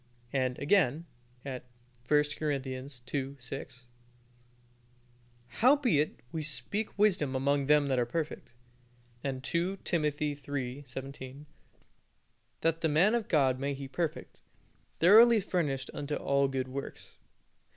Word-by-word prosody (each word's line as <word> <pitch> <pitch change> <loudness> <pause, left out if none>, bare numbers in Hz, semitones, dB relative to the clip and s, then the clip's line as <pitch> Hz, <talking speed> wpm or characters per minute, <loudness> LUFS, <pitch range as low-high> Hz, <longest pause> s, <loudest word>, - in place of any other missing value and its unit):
And, 130 -2 0
again, 160 -1 +2 0.4
at 130 -2 -5 0.4
1 150 +1 +5 0.2
Cor. 155 -1 0
ii. 130 -1 -4 0.5
6 125 0 -7 1.6
"Howbeit, 245 - +2
we 160 - -3
speak 200 +9 -1
wisdom 185 -10 +2
among 140 +1 +1
them 150 -1 +5
that 135 -2 +1
are 120 - +2
perfect." 155 -3 -4 0.7
And 130 -2 -3
(2 175 +5 -1
Timothy 150 -3 0
iii. 135 -1 -3
17) 135 +2 -8 1.2
"That 165 0 +1
the 160 - +2
man 170 +9 +4
of 235 -3 0
God 135 -5 +2
may 140 +1 -2
he 135 0 -7
perfect, 160 +3 -4 0.6
thoroughly 220 +6 +8
furnished 145 -9 -2
unto 145 0 -3
all 140 0 +1
good 130 -1 -3
works." 135 +1 -7
145 Hz, 120 wpm, -30 LUFS, 135-165 Hz, 1.6 s, thoroughly